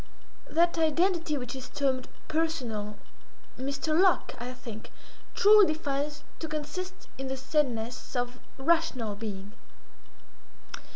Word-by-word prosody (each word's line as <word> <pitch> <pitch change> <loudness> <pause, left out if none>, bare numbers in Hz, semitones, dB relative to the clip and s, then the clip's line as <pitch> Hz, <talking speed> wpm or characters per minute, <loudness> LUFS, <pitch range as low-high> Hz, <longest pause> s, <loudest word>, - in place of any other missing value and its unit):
That 340 +1 +3
identity 325 0 +2
which 250 -1 -4
is 260 -1 -7
termed 265 -2 0 0.2
personal, 245 -11 -1 0.6
Mr. 280 +4 -1
Locke, 370 +1 +4
I 245 +1 -4
think, 230 -4 -8 0.5
truly 415 -4 +8
defines 290 -1 -2 0.2
to 320 - -3
consist 315 +5 -5
in 270 - -3
the 265 0 -2
saneness 255 -4 -1
of 245 0 -1 0.2
rational 270 -7 +2
being. 205 -2 -6
280 Hz, 110 wpm, -29 LUFS, 245-325 Hz, 0.6 s, truly